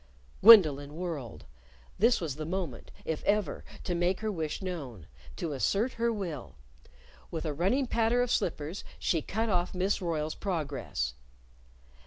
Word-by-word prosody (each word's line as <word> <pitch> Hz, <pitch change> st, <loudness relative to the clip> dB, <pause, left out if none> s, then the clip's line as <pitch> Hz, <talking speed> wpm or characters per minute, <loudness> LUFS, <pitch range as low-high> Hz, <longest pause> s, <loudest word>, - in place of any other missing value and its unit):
_ -, -, -25 dB
Gwendolyn 155 Hz, -10 st, +8 dB
whirled. 160 Hz, -, -5 dB, 0.5 s
This 230 Hz, +4 st, +4 dB
was 155 Hz, -6 st, -3 dB
the 155 Hz, -, -4 dB
moment, 170 Hz, -9 st, -4 dB, 0.2 s
if 160 Hz, -1 st, -3 dB
ever, 210 Hz, 0 st, 0 dB, 0.2 s
to 180 Hz, -, -2 dB
make 175 Hz, +3 st, 0 dB
her 215 Hz, -1 st, -1 dB
wish 160 Hz, -5 st, -3 dB
known 140 Hz, -, -6 dB, 0.3 s
to 165 Hz, -4 st, -3 dB
assert 200 Hz, -, +1 dB
her 235 Hz, 0 st, 0 dB
will. 175 Hz, -, -5 dB, 0.7 s
With 165 Hz, -1 st, -4 dB
a 155 Hz, -, -1 dB
running 195 Hz, -, +1 dB
patter 235 Hz, +1 st, +2 dB
of 245 Hz, -, -2 dB
slippers, 160 Hz, +2 st, -1 dB
she 165 Hz, -, +1 dB
cut 220 Hz, +9 st, -2 dB
off 180 Hz, -1 st, 0 dB
Miss 190 Hz, +2 st, 0 dB
Royle's 155 Hz, -3 st, -1 dB
progress. 145 Hz, -, -3 dB
175 Hz, 150 wpm, -30 LUFS, 150-205 Hz, 0.7 s, Gwendolyn